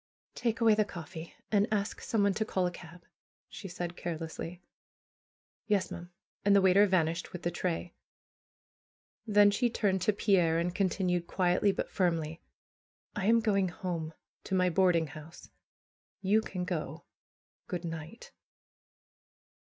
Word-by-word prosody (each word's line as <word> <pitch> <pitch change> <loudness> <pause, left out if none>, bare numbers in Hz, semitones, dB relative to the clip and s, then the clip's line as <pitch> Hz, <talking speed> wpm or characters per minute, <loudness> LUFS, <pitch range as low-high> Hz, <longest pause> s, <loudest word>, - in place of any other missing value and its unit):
^Take 230 -2 -1
away 225 -1 +6
the 215 0 +3
coffee, 170 -3 -9 0.2
and 205 +1 +2
ask 205 -1 -1
someone 200 -3 +1
to 220 - 0
call 190 -4 0
a 180 - 0
cab," 175 0 -12 0.4
she 195 - -8
said 175 -1 -5
carelessly. 165 +1 -5 1.1
^^Yes, 200 -3 +1
ma'am!" 175 0 -7 0.3
And 200 0 +5
the 200 - +6
waiter 190 +2 +6
vanished 170 -2 0
with 180 - -8
the 175 - 0
tray. 175 0 -3 1.3
Then 205 -1 +6
she 240 +4 +1
turned 195 -5 0
to 215 - +3
Pierre, 185 -5 +2
and 170 +1 0
continued 180 -2 0
quietly, 185 +2 +2
but - - -4
firmly: 165 -4 0 0.7
"1 200 -1 -1
am 230 +1 +5
going 200 -4 +2
home, 165 -3 -4 0.3
to 190 - -1
my 180 -1 +3
boarding 175 -2 +3
house. 155 +2 -12 0.7
You 205 +3 +3
can 180 -4 -4
go! 160 -3 -4 0.6
Good 180 -2 -4
night 165 +6 -7
180 Hz, 140 wpm, -31 LUFS, 170-200 Hz, 1.3 s, away